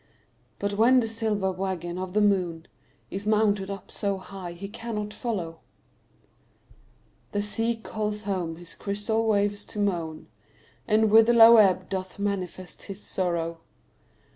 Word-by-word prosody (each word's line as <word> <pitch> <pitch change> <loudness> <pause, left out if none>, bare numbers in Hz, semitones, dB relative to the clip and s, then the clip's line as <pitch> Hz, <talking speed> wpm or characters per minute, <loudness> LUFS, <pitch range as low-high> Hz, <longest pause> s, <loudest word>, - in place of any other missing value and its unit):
But 200 0 -2
when 235 +5 +5
the 230 - 0
silver 220 -4 -1
waggon 185 -2 -3
of 185 -1 -5
the 210 - +3
moon 180 -5 +1 0.5
Is 195 +2 -5
mounted 210 -2 +2
up 195 -2 -7
so 200 -1 -1
high 185 -2 -8
he 200 +3 -7
cannot 210 -1 -5
follow, 175 -9 -4 1.7
The 205 0 0
sea 225 +3 0
calls 215 -1 -4
home 185 -5 -2
his 175 +1 -8
crystal 215 +3 -1
waves 205 -1 +1
to - - -10
moan, 170 -6 -2 0.6
And 220 -1 +3
with 225 +1 +7
low 230 0 +9
ebb 185 -3 +4
doth 185 -1 -5
manifest 185 -3 -4
his 195 -1 -7
sorrow. 170 -4 -2
200 Hz, 140 wpm, -26 LUFS, 185-215 Hz, 1.7 s, low